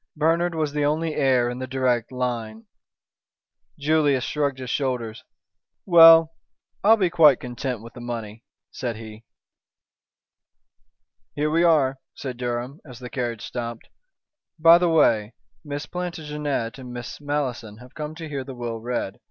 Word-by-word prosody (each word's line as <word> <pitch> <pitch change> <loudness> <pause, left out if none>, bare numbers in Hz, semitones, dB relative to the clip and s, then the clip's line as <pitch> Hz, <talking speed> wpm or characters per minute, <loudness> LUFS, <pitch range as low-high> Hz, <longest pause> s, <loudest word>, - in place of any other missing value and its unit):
"Bernard 165 +3 +1
was 155 -2 -1
the 150 -1 0
only 155 +2 0
heir 130 -5 +2
in 125 +1 -4
the 130 - -5
direct 130 -3 0
line." 115 -3 -4 1.1
Julius 145 -3 +2
shrugged 145 -3 -1
his 130 -2 -6
shoulders. 125 -5 -2 0.6
"Well, 165 -2 +8 0.5
I'll 220 +3 +6
be 185 -5 +1
quite 155 -6 +6
content 125 -2 -5
with 115 0 -12
the 120 - -10
money," 115 -2 -6 0.3
said 120 -3 -4
he. 110 0 -11 2.1
"Here 150 +1 0
we 165 +2 +2
are," 145 -6 +3 0.2
said 130 -3 -6
Durham, 125 +4 -4
as 125 -5 -12
the 125 -1 -9
carriage 120 -3 -3
stopped. 120 -2 -6 0.7
"By 165 +1 +7
the 175 -1 +2
way, 115 -9 +2 0.3
Miss 145 0 -5
Plantagenet 150 -8 -4
and 125 -1 -9
Miss 120 +3 -8
Malleson 130 -7 -3
have 125 +2 -15
come 150 0 -6
to 160 -1 -7
hear 140 -3 -4
the 130 0 -9
will 120 -2 -5
read. 120 -4 -4
130 Hz, 145 wpm, -24 LUFS, 120-155 Hz, 2.1 s, Well